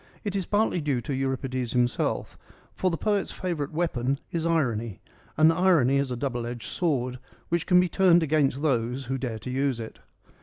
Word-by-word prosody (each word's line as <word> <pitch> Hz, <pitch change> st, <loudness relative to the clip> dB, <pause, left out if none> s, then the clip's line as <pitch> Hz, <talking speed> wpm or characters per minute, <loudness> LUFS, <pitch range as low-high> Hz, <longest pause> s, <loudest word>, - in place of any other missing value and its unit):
It 205 Hz, -2 st, -3 dB
is 190 Hz, -3 st, -2 dB
partly 205 Hz, -4 st, +1 dB
due 145 Hz, -4 st, 0 dB
to 140 Hz, -, -4 dB
Euripides 130 Hz, -2 st, -2 dB
himself, 125 Hz, -1 st, 0 dB, 0.4 s
for 185 Hz, -, 0 dB
the 165 Hz, -, -2 dB
poet's 205 Hz, 0 st, 0 dB
favourite 165 Hz, -6 st, -3 dB
weapon 140 Hz, -5 st, -1 dB
is 165 Hz, -1 st, -1 dB
irony, 120 Hz, -, 0 dB, 0.4 s
and 155 Hz, +2 st, +6 dB
irony 165 Hz, -7 st, +3 dB
is 140 Hz, -1 st, 0 dB
a 125 Hz, -, -3 dB
double 120 Hz, -3 st, -2 dB
edged 120 Hz, -1 st, -6 dB
sword 130 Hz, -7 st, -1 dB, 0.3 s
which 170 Hz, 0 st, 0 dB
can 180 Hz, -1 st, +6 dB
be 180 Hz, -, +3 dB
turned 175 Hz, -2 st, +4 dB
against 145 Hz, -2 st, +1 dB
those 125 Hz, -2 st, 0 dB
who 135 Hz, +2 st, -2 dB
dare 120 Hz, -4 st, -3 dB
to 125 Hz, +4 st, -7 dB
use 135 Hz, -2 st, 0 dB
it. 110 Hz, -1 st, -8 dB
140 Hz, 185 wpm, -26 LUFS, 125-170 Hz, 0.4 s, and